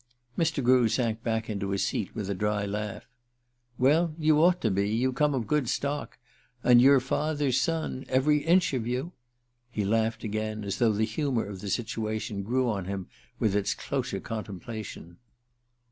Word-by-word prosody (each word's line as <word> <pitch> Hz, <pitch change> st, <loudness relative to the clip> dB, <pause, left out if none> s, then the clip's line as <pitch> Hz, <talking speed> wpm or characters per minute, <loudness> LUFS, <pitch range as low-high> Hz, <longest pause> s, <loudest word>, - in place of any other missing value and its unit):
Mr. 160 Hz, -4 st, 0 dB
Grew 125 Hz, -2 st, +5 dB
sank 115 Hz, -3 st, 0 dB
back 110 Hz, -1 st, -1 dB
into 100 Hz, -2 st, -3 dB
his 100 Hz, 0 st, 0 dB
seat 100 Hz, -, -3 dB
with 105 Hz, -4 st, -3 dB
a 100 Hz, -, -1 dB
dry 105 Hz, +1 st, -1 dB
laugh. 105 Hz, +1 st, -4 dB, 0.7 s
"Well, 155 Hz, +5 st, +3 dB
you 155 Hz, -2 st, +3 dB
ought 180 Hz, +1 st, +4 dB
to 110 Hz, -, +1 dB
be. 100 Hz, +2 st, +1 dB
You 125 Hz, +4 st, +1 dB
come 145 Hz, +2 st, +2 dB
of 120 Hz, -4 st, -1 dB
good 150 Hz, -3 st, 0 dB
stock. 145 Hz, +1 st, -2 dB, 0.5 s
And 120 Hz, -1 st, +7 dB
you're 135 Hz, +1 st, +7 dB
father's 140 Hz, 0 st, 0 dB
son, 160 Hz, -3 st, -2 dB
every 145 Hz, +3 st, +3 dB
inch 170 Hz, +2 st, +3 dB
of 120 Hz, -3 st, -1 dB
you!" 125 Hz, +8 st, -2 dB, 0.6 s
He 105 Hz, -4 st, -2 dB
laughed 110 Hz, +2 st, 0 dB
again, 110 Hz, 0 st, -3 dB
as 100 Hz, 0 st, -3 dB
though 115 Hz, -3 st, +4 dB
the 110 Hz, +2 st, +1 dB
humor 120 Hz, +1 st, -1 dB
of 100 Hz, -2 st, -8 dB
the 100 Hz, -, -5 dB
situation 110 Hz, -2 st, -2 dB
grew 125 Hz, +5 st, 0 dB
on 100 Hz, -5 st, -1 dB
him 95 Hz, -1 st, -5 dB, 0.3 s
with 105 Hz, -3 st, +1 dB
its 100 Hz, -1 st, +1 dB
closer -, -, -3 dB
contemplation. 105 Hz, -4 st, -7 dB
115 Hz, 175 wpm, -28 LUFS, 105-135 Hz, 0.7 s, And